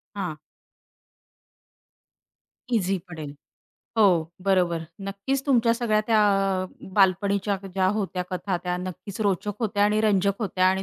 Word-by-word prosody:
हां. 180 -6 -3 2.4
ईझी 195 -4 +1
पडेल. 155 -4 -7 0.7
हो, 215 - +7 0.4
बरोबर. 180 -4 +2 0.3
नक्कीच 260 +8 -2
तुमच्या 235 -4 +4
सगळ्या 230 -3 +1
त्या 225 -2 +3 0.4
अ, - - -4 0.3
बालपणीच्या 200 +1 +2 0.2
ज्या 190 -1 +2
होत्या 190 -3 -2
कथा 185 0 -2
त्या 180 -1 -1
नक्कीच 185 +3 -7
रोचक 205 0 0
होत्या 205 -2 +1
आणि 210 +1 +2
रंजक 200 -2 +2
होत्या 185 -3 +1
आणि 190 +1 +2
195 Hz, 120 wpm, -25 LUFS, 185-215 Hz, 2.4 s, हो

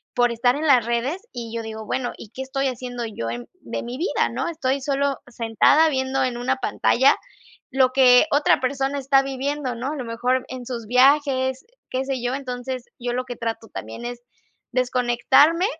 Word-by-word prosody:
por 245 -1 +3
estar 245 +2 +2
en 310 +2 -2
las 250 -5 +5
redes, 240 +10 -1
y 230 -2 -6
yo 230 - -3
digo: 220 0 -7
"Bueno, 250 +1 -2
¿y 215 - -11
qué 260 +4 -6
estoy 270 +1 -1
haciendo 245 -1 -4
yo 205 - -5
en 120 +1 -6
de - - -5
mi 240 +2 -6
vida?, 340 +7 0
¿no? - - -2
Estoy 280 -5 -1
solo 280 0 0
sentada 240 +7 +3
viendo 265 -1 0
en 250 -2 -1
una 260 +2 0
pantalla 260 +1 +3 0.5
lo 260 -2 +3
que 255 +1 +6
otra 290 +1 +4
persona 270 +2 -1
está 270 0 +3
viviendo", 275 -1 -3
¿no? 245 +3 -4
A - - -4
lo 260 - -4
mejor, 250 +3 0
en 255 -1 -7
sus 235 -3 -5
viajes, 260 +1 +3
eh, - - -32 0.2
qué 260 +1 -1
sé 265 -3 -2
yo. 245 +1 -1
Entonces, 255 -2 -5
yo 245 -1 -3
lo 255 +1 -2
que 245 -1 -6
trato 225 -1 -4
también 110 - -7
es 240 0 -6 0.5
desconectarme, 255 +7 +3
255 Hz, 195 wpm, -23 LUFS, 240-270 Hz, 0.5 s, que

